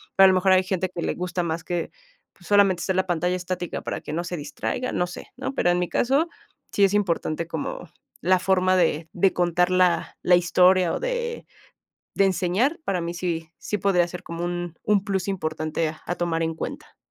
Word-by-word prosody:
pero 195 Hz, -, +8 dB
a -, -, +9 dB
lo 190 Hz, -, +4 dB
mejor 185 Hz, +1 st, +4 dB
hay 185 Hz, 0 st, +5 dB
gente 185 Hz, 0 st, -1 dB
que 170 Hz, -2 st, -5 dB
le -, -, 0 dB
gusta 180 Hz, 0 st, -2 dB
más 165 Hz, 0 st, -3 dB
que, 175 Hz, -2 st, -3 dB, 0.4 s
pues 175 Hz, -, -17 dB
solamente 200 Hz, -3 st, +4 dB
hacer 190 Hz, -, -1 dB
la 190 Hz, -, +2 dB
pantalla 180 Hz, +1 st, 0 dB
estática 180 Hz, -1 st, -4 dB
para -, -, -4 dB
que 150 Hz, -, -7 dB
no 170 Hz, +2 st, -1 dB
se 175 Hz, -1 st, -4 dB
distraiga, 150 Hz, -, -3 dB
no 175 Hz, -, +1 dB
sé, 175 Hz, -, -9 dB
¿no? -, -, -4 dB
Pero 175 Hz, -, +1 dB
en 175 Hz, -, +1 dB
mi 180 Hz, -, -1 dB
caso, 275 Hz, +7 st, +2 dB, 0.4 s
sí 200 Hz, -, +3 dB
es 195 Hz, -, +1 dB
importante 170 Hz, -5 st, 0 dB
como 160 Hz, -3 st, -5 dB, 0.3 s
la 185 Hz, +2 st, +3 dB
forma 185 Hz, 0 st, +2 dB
de 165 Hz, -2 st, +1 dB
de 190 Hz, +2 st, +3 dB
contar 175 Hz, 0 st, +2 dB
la 180 Hz, -2 st, +2 dB
la 180 Hz, -, +6 dB
historia, 180 Hz, +1 st, +4 dB
o -, -, -2 dB
de 485 Hz, -1 st, -3 dB, 0.7 s
de 195 Hz, -, +4 dB
enseñar, 195 Hz, -, +1 dB
para 190 Hz, -2 st, 0 dB
mí 170 Hz, 0 st, -3 dB
sí 170 Hz, -2 st, -3 dB
sí 210 Hz, -, -2 dB
podría 185 Hz, -3 st, +3 dB
ser 180 Hz, +1 st, -8 dB
como 170 Hz, 0 st, -5 dB
un 175 Hz, -1 st, -4 dB
un 205 Hz, -2 st, +2 dB
plus 195 Hz, -2 st, -1 dB
importante 155 Hz, -3 st, -2 dB
a 175 Hz, -, -2 dB
tomar 165 Hz, -2 st, -1 dB
en 165 Hz, 0 st, -1 dB
cuenta. -, -, -7 dB
180 Hz, 210 wpm, -24 LUFS, 170-190 Hz, 0.7 s, a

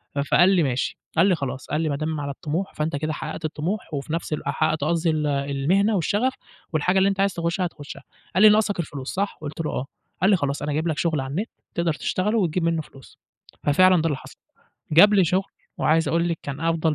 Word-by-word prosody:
ف -, -, -1 dB
فقال 175 Hz, +6 st, +4 dB
لي: 185 Hz, -4 st, +3 dB
"ماشي"، 130 Hz, -3 st, -1 dB, 0.2 s
قال 175 Hz, +4 st, +5 dB
لي: 185 Hz, -, +4 dB
"خلاص"، 135 Hz, -4 st, -5 dB
قال 155 Hz, -, -1 dB
لي: 160 Hz, -, 0 dB
"ما 140 Hz, -, -1 dB
دام 155 Hz, +1 st, -3 dB
على 140 Hz, -1 st, -3 dB
الطموح 165 Hz, +6 st, -4 dB
فأنت 155 Hz, 0 st, -2 dB
كده 155 Hz, +2 st, -2 dB
حققت 160 Hz, -, -5 dB
الطموح 160 Hz, +5 st, -3 dB
وفي 145 Hz, +2 st, -4 dB
نَفْس 165 Hz, -1 st, -2 dB
الوق 150 Hz, -, -3 dB
حققت 155 Hz, -1 st, 0 dB
قصدي 165 Hz, +2 st, +1 dB
ال 155 Hz, -1 st, 0 dB
المهنة 145 Hz, +9 st, +1 dB
والشغف 205 Hz, +8 st, +1 dB, 0.4 s
والحاجة 180 Hz, +5 st, +2 dB
اللي 190 Hz, +1 st, +4 dB
أنت 195 Hz, -1 st, -3 dB
عايز 195 Hz, -1 st, +2 dB
تخُشها 170 Hz, +2 st, -1 dB
هتخُشها"، 150 Hz, -4 st, -8 dB, 0.3 s
قال 190 Hz, -, +5 dB
لي: 215 Hz, -, +10 dB
"ناقصك 210 Hz, -2 st, +2 dB
الفلوس، 145 Hz, -5 st, -5 dB
صح؟" 200 Hz, +2 st, -2 dB
قُلت 155 Hz, +1 st, -5 dB
له: 155 Hz, -, -2 dB
"آه"، 130 Hz, -, -3 dB, 0.4 s
قال 190 Hz, -, +4 dB
لي: 205 Hz, -, +6 dB
"خلاص 140 Hz, -4 st, -2 dB
أنا 145 Hz, 0 st, -2 dB
جايب 155 Hz, +3 st, -1 dB
لك 155 Hz, -2 st, -1 dB
شغل 155 Hz, -2 st, 0 dB
على 135 Hz, 0 st, -5 dB
النت 200 Hz, +10 st, -2 dB, 0.3 s
تقدَر 170 Hz, -1 st, +1 dB
تشتغله 200 Hz, +8 st, -1 dB
وتجيب 180 Hz, -2 st, 0 dB
مِنُه 165 Hz, -1 st, +1 dB
فلوس."، 135 Hz, -3 st, -16 dB, 0.4 s
ففعلًا 185 Hz, +4 st, +5 dB
ده 165 Hz, -, +1 dB
اللي 145 Hz, -4 st, -1 dB
حصل. -, -, -13 dB, 0.6 s
جاب 205 Hz, +7 st, +7 dB
لي 195 Hz, -3 st, +5 dB
شغل 185 Hz, +4 st, 0 dB, 0.3 s
وعايز 160 Hz, 0 st, +2 dB
أقول 170 Hz, +3 st, +1 dB
لِك 165 Hz, -1 st, -2 dB
كان 140 Hz, 0 st, -6 dB
أفضل 165 Hz, -1 st, +1 dB
165 Hz, 230 wpm, -24 LUFS, 150-185 Hz, 0.6 s, لي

